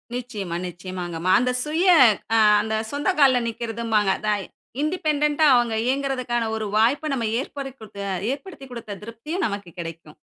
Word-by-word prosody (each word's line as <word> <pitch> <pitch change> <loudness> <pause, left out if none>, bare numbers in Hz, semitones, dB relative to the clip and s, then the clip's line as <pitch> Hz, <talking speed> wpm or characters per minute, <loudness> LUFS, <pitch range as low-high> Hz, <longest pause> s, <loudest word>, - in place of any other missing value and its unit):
நிச்சயமா, 215 -8 -5
நிச்சயமாங்கம்மா. 175 -1 -4
அந்த 250 0 +1
சுய 320 +5 0 0.5
அ - - +5 0.2
அந்த 220 0 -2 0.2
சொந்த 290 +6 -1
கால்ல 260 -3 +5
நிக்கிறதும்பாங்க. 225 -3 0
அத 215 - -5 0.5
இண்டிபெண்டென்ட்டா 300 -2 +1
அவுங்க 240 -2 +2
இயங்குறதுக்கான 255 -3 -1
ஒரு 220 -1 -3
வாய்ப்ப 275 +7 +2
நம்ம 240 -4 -1
ஏற்படுத்திகுதுக்க 265 -7 -8 0.4
ஏற்படுத்திக் 280 -5 -10
குடுத்த 215 -4 -7
திருப்தியும் 230 - -4
நமக்கு 200 -3 -6
கெடைக்கும். 165 -2 -8
240 Hz, 130 wpm, -23 LUFS, 210-280 Hz, 0.5 s, அ